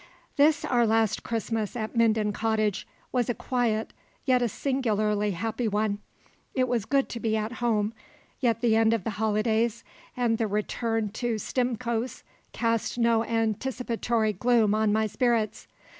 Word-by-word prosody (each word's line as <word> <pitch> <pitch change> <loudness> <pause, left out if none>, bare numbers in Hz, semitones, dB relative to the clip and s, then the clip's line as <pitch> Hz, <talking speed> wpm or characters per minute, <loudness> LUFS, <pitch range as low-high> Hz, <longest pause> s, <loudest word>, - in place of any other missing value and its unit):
This 295 +1 +4
our 240 -2 +3
last 220 -1 +2
Christmas 225 -2 -2
at 220 -1 -4
Minden 220 -2 +2
Cottage 215 -2 0 0.2
was 245 -2 0
a 240 - 0
quiet 235 -4 -1 0.3
yet 255 -2 +3
a 240 - +1
singularly 215 -5 0
happy 225 +5 -2
one. 210 0 0 0.6
It 255 -1 +2
was 240 -4 0
good 275 +2 +2
to 235 - -5
be 220 -1 0
at 215 +1 -2
home, 220 -2 +1 0.5
yet 230 -3 +1
the 230 -3 +3
end 225 0 +4
of 215 - -4
the 225 - -2
holidays 220 +1 +1 0.3
and 235 -2 +1
the 225 - +1
return 215 +1 -1
to 230 +2 -2
Stimcoe's 240 +1 -2 0.3
cast 230 0 -1
no 230 -1 +3
anticipatory 230 0 -1
gloom 225 +1 +3
on 215 -1 +2
my 220 +1 +2
spirits. 230 -1 0
225 Hz, 150 wpm, -27 LUFS, 215-240 Hz, 0.6 s, This